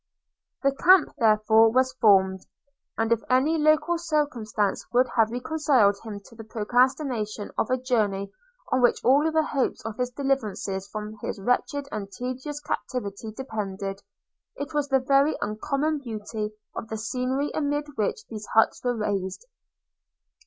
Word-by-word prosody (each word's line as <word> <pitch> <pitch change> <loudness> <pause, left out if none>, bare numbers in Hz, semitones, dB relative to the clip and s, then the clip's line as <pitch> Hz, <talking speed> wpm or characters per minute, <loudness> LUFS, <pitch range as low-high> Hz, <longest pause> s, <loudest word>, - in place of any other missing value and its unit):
The 275 - +4
camp, 350 +4 +5
therefore, 220 0 +5
was 260 +2 +2
formed; 190 -3 +5 0.6
and 225 0 0
if 230 -1 +3
any 280 +6 +3
local 310 +2 +3
circumstance 255 - -1
could 250 +1 +2
have 225 -2 +4
reconciled 250 -5 +2
him 215 -3 -7
to 230 - -16
the 225 - -9
procrastination 230 -1 0
of - - 0
a 255 - +2
journey 210 -6 0 0.4
on 255 - +2
which 245 - +2
all 285 +6 +4
the 315 0 +2
hopes 275 -6 -2
of 225 -1 -5
his 250 0 -1
deliverance 270 -6 -1 0.2
from 215 0 -6
his - - -4
wretched 260 +6 0
and 200 -2 -5
tedious 255 +7 -5
captivity 220 -7 -4
depended, 200 -5 -5 0.5
it 285 +2 -6
was 295 -1 0
the 270 -1 +3
very 275 +3 +3
uncommon 275 +8 -1
beauty 215 -3 -5 0.3
of - - -5
the 220 - -3
scenery 255 +5 -2
amid 290 -1 -1
which 425 - -2
these 215 -2 -8
huts 225 - +3
were 245 -1 0
raised. 200 - -2
245 Hz, 145 wpm, -26 LUFS, 215-280 Hz, 0.6 s, camp